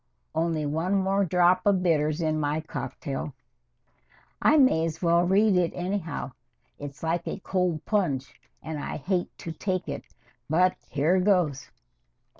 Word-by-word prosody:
Only 160 -1 0
one 165 +6 0
more 195 +1 +2
drop 180 +1 +3
of 195 -3 +2
bitters 155 -2 +1
in 155 -1 0
my 150 +1 0
cocktail. 135 -1 -5 1.1
I 310 - +5
may 255 - +4
as 165 -1 -3
well 170 0 +3
read 200 +2 +4
it 175 -2 +2
anyhow. 175 -6 -3 0.5
It's 145 +1 -8
like 165 +1 -1
a - - -4
cold 180 -5 -1
plunge, 150 -11 0 0.3
and 155 -1 -5
I - - -4
hate 180 +4 -1
to 165 - -6
take 185 +3 -2
it, - - -5 0.4
but 180 +4 +3
here 160 +6 +2
goes." 180 -9 +1
170 Hz, 145 wpm, -27 LUFS, 155-185 Hz, 1.1 s, I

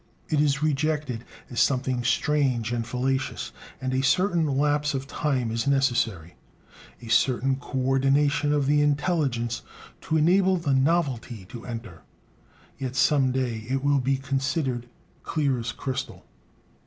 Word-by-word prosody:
It 150 -2 +2
is 145 0 +1
rejected 150 -5 0 0.3
as 120 - -2
something 130 -2 +1
strange 125 -2 +1
and 115 -1 -2
fallacious; 130 +2 -2 0.3
and 130 0 -2
a 130 - +1
certain 175 +2 +2
lapse 145 +1 +1
of 135 0 -3
time 135 -5 -1
is 115 +4 -2
necessary, 120 - +1 0.7
a - - -9
certain 130 +3 +2
coordination 135 +3 +1
of 145 -2 +2
the 145 +1 +3
intelligence, 140 -6 0 0.5
to 160 - +3
enable 185 +4 +4
the 155 -5 0
"novelty" 130 - 0
to 120 0 -9
enter. 115 -9 -7 0.8
Yet 130 -1 -4
some 135 -1 +3
day 120 -4 -2
it 135 +1 -1
will 145 0 +3
be 135 +1 +1
considered 135 -2 -2 0.3
clear 140 -5 0
as 115 0 -3
crystal. 130 +1 -5
135 Hz, 135 wpm, -26 LUFS, 125-145 Hz, 0.8 s, enable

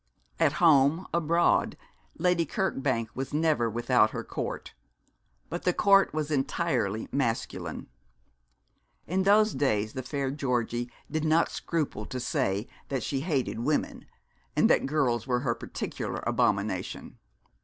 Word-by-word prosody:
At 160 -3 +3
home, 160 0 +4
abroad, 170 +1 +2 0.4
Lady 180 -2 +2
Kirkbank 135 -9 -1
was 135 +2 -4
never 150 -7 +2
without 120 0 +3
her - - -5
court; - - -5 0.7
but 170 - -4
the 180 - +1
court 195 -1 +5
was 155 -1 -3
entirely 130 - 0
masculine. 120 -5 -2 1.2
In 185 +3 0
those 210 +3 +4
days 110 -6 0
the 130 - -4
fair 135 +1 -2
Georgie 120 -3 -1 0.2
did 155 -1 -1
not 160 +1 +3
scruple 150 -10 -3
to 130 - -4
say 100 -3 -1 0.2
that 135 -4 -2
she 135 - -1
hated 140 -6 -1
women, 145 +5 -1 0.5
and - - +4
that - - +3
girls 135 -5 0
were 125 -1 +1
her 120 -3 0
particular 115 - -5
abomination. - - -1
140 Hz, 130 wpm, -28 LUFS, 120-165 Hz, 1.2 s, court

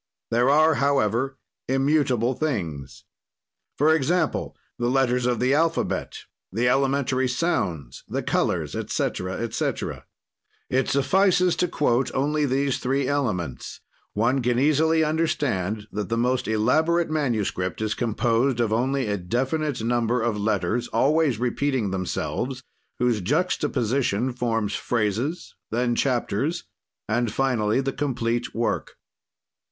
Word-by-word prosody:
"There 120 +3 +3
are, 155 +3 +5
however, 135 -2 +1 0.3
immutable 135 -3 +2
things. 90 - -4 0.7
"For 155 +3 +4
example: 160 +4 0 0.2
the 120 - 0
letters 125 -1 +2
of 120 -2 0
the 130 +2 +2
alphabet, 165 +2 0 0.3
the 115 +6 +1
elementary 135 0 +1
sounds, 100 - -2
the - - -3
colors - - 0
etc., 95 +1 -2
etc. 115 +3 -3 0.6
"It 130 +1 +1
suffices 180 +5 +3
to 180 - +2
quote 130 -5 +1
only 150 +2 +1
these 135 +1 0
three 135 +1 0
elements; 105 - -2 0.3
one 120 +6 +1
can 120 0 +1
easily 155 +4 +3
understand 125 - -1
that 105 -2 -4
the 115 - 0
most 125 -1 0
elaborate 155 +10 +2
manuscript 110 -11 -1
is 110 -1 -1
composed 120 +2 +1
of 115 -2 +1
only 130 +3 +1
a 105 -1 -1
definite 130 - -1
number 120 +1 +1
of 115 -1 0
letters 110 +3 0
always 150 -3 +2
repeating 125 -2 0
themselves, 125 +7 -3 0.3
whose 120 -4 +1
juxtaposition 125 - 0
forms 115 -4 -1
phrases, 115 - -2 0.2
then 120 +1 0
chapters, 130 - 0 0.4
and 120 +1 0
finally 120 -2 +1
the 135 0 -2
complete 120 -4 -2
work. 115 0 -2
125 Hz, 120 wpm, -24 LUFS, 110-140 Hz, 0.7 s, are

